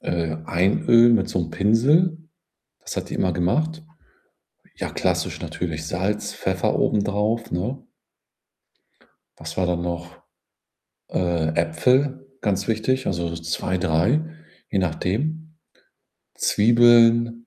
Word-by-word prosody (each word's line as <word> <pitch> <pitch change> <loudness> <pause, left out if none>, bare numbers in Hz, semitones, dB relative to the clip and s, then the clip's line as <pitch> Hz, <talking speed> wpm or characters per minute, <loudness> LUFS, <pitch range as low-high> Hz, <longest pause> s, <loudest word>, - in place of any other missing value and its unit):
äh, 80 -2 -2
einölen 115 +6 +4
mit - - +1
so 90 - -1
'nem 80 -1 -4
Pinsel. 130 - +3 0.6
Das - - -7
hat - - -4
die - - -5
immer 90 -2 0
gemacht. 155 - -1 0.9
Ja, - - -4
klassisch - - -2
natürlich. 80 -2 -5
Salz, 95 +5 -2
Pfeffer - - -1
obendrauf, 105 +3 0
ne? 105 +10 -3 1.6
Was - - -8
war 95 - +1
dann 85 -1 -1
noch? 85 -1 -4 1.0
Äh, 85 -3 0
Äpfel, 125 - +1
ganz 100 -2 -1
wichtig, 115 +4 0
also, 85 -1 -1
so 85 - -5
2, 85 +2 -2
3, 95 - +1 0.5
je 100 - 0
nachdem. 145 - -2 0.8
Zwiebeln 115 +1 +4
100 Hz, 115 wpm, -22 LUFS, 85-120 Hz, 1.6 s, einölen